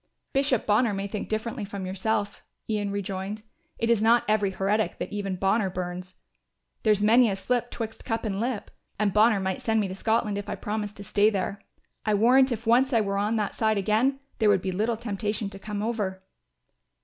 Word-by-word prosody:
"Bishop 270 -4 +2
Bonner 215 0 +3
may 195 0 -3
think 200 +1 -5
differently 220 +1 -2
from 200 -1 -5
yourself," 205 +2 -2 0.3
Ian 210 -2 -1
rejoined; 200 +1 -4 0.3
"it 230 - 0
is 230 -2 +3
not 230 +2 +5
every 210 -2 +2
heretic 200 +3 0
that - - -5
even 200 -2 -2
Bonner 195 +2 +1
burns. 180 0 -5 0.7
There's 210 -2 +3
many 230 +2 +6
a 195 - -1
slip 245 +4 -1
twixt 220 -2 -6
cup 225 -1 -2
and 200 -2 -2
lip; 235 -2 -3 0.3
and 205 -2 +1
Bonner 215 0 +5
might 190 -1 -2
send 225 -1 +1
me 205 - 0
to 185 - -5
Scotland 215 0 0
if 205 - -7
I - - -2
promised 210 0 -4
to 200 - -7
stay 205 +1 +3
there. 200 -1 -3 0.4
I 215 -1 +2
warrant 255 +5 +5
if 230 0 -3
once 255 +4 +4
I 230 - +4
were 200 -1 -1
on 210 +3 0
that 210 -2 -1
side 220 -1 +1
again, 220 +7 +1 0.2
there 215 -2 +4
would 195 -3 +3
be 190 - -1
little 220 +5 0
temptation 210 -2 -3
to 195 - -9
come 210 0 -4
over." 205 -5 -2
210 Hz, 200 wpm, -26 LUFS, 200-225 Hz, 0.7 s, many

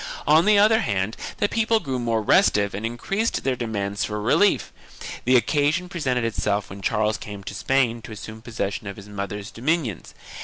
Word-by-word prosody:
2 150 - +4
On 160 +3 +6
the 210 0 +5
other 215 +2 +5
hand 100 0 -1 0.2
the 205 - +2
people 225 +1 +2
grew 135 -9 -3
more 115 -2 0
restive 105 - +3
and 105 +4 -2
increased 195 - -2
their 135 -1 +1
demands 105 -4 -2
for 105 0 -3
relief. 130 - +2 0.5
The 130 +2 +4
occasion 150 +8 +1
presented 130 -9 -1
itself 105 -3 -1
when 100 +1 -8
Charles 105 +3 0
came 100 -2 -8
to - - -6
Spain 125 -4 +1
to 115 - -10
assume 110 +1 -8
possession 110 -3 -4
of 100 - -5
his 100 -1 -11
mother's 100 +1 -5
dominions. 130 - -2
115 Hz, 185 wpm, -24 LUFS, 105-150 Hz, 0.5 s, On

